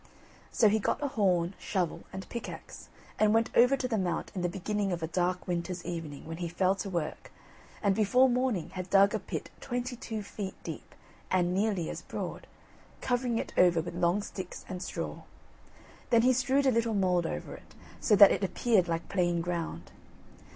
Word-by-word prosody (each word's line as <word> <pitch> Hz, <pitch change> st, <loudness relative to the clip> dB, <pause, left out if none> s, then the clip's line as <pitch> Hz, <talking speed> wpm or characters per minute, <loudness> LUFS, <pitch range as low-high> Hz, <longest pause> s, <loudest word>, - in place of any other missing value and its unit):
So 220 Hz, -, +4 dB
he 215 Hz, +1 st, +3 dB
got 215 Hz, -, -1 dB
a 285 Hz, -, 0 dB
horn, 185 Hz, -6 st, +1 dB
shovel, 180 Hz, -5 st, -2 dB
and 190 Hz, -, -7 dB
pickaxe, 235 Hz, -, -8 dB, 0.3 s
and 215 Hz, 0 st, +4 dB
went 225 Hz, +1 st, +1 dB
over 250 Hz, +3 st, +6 dB
to 255 Hz, -, -2 dB
the 225 Hz, -4 st, 0 dB
Mount 175 Hz, -3 st, -2 dB
in 185 Hz, -, -3 dB
the 175 Hz, -, 0 dB
beginning 200 Hz, +2 st, -2 dB
of 170 Hz, -2 st, -3 dB
a -, -, 0 dB
dark 180 Hz, +2 st, -1 dB
winter's 175 Hz, 0 st, -3 dB
evening, 165 Hz, -5 st, -5 dB
when 165 Hz, +1 st, -6 dB
he 175 Hz, 0 st, -3 dB
fell 185 Hz, +2 st, +2 dB
to 195 Hz, 0 st, -5 dB
work, 170 Hz, -4 st, -4 dB, 0.5 s
and 200 Hz, -1 st, +4 dB
before 220 Hz, +6 st, +4 dB
morning 250 Hz, -8 st, 0 dB
had 185 Hz, -1 st, -6 dB
dug 200 Hz, +1 st, +5 dB
a -, -, 0 dB
pit -, -, -6 dB
twenty 245 Hz, 0 st, -3 dB
two 225 Hz, -3 st, -5 dB
feet 200 Hz, -1 st, -6 dB
deep, -, -, -8 dB, 0.3 s
and 180 Hz, -1 st, +2 dB
nearly 195 Hz, -4 st, 0 dB
as -, -, -6 dB
broad, -, -, -6 dB, 0.5 s
covering 245 Hz, -2 st, 0 dB
it -, -, -4 dB
over 175 Hz, -2 st, +5 dB
with 175 Hz, +2 st, -4 dB
long 175 Hz, +3 st, +1 dB
sticks 185 Hz, -3 st, -7 dB
and 180 Hz, -1 st, -5 dB
straw. -, -, -5 dB, 0.9 s
Then 230 Hz, -2 st, +5 dB
he 255 Hz, +1 st, +5 dB
strewed 265 Hz, +2 st, +2 dB
a 265 Hz, -, +5 dB
little 230 Hz, -2 st, +1 dB
mould 180 Hz, -3 st, +2 dB
over -, -, -5 dB
it, -, -, -14 dB, 0.2 s
so 215 Hz, -, +4 dB
that 200 Hz, 0 st, +9 dB
it -, -, 0 dB
appeared 195 Hz, 0 st, +2 dB
like 165 Hz, 0 st, -2 dB
plain 175 Hz, -3 st, +1 dB
ground. 170 Hz, -1 st, -4 dB
195 Hz, 190 wpm, -30 LUFS, 175-225 Hz, 0.9 s, that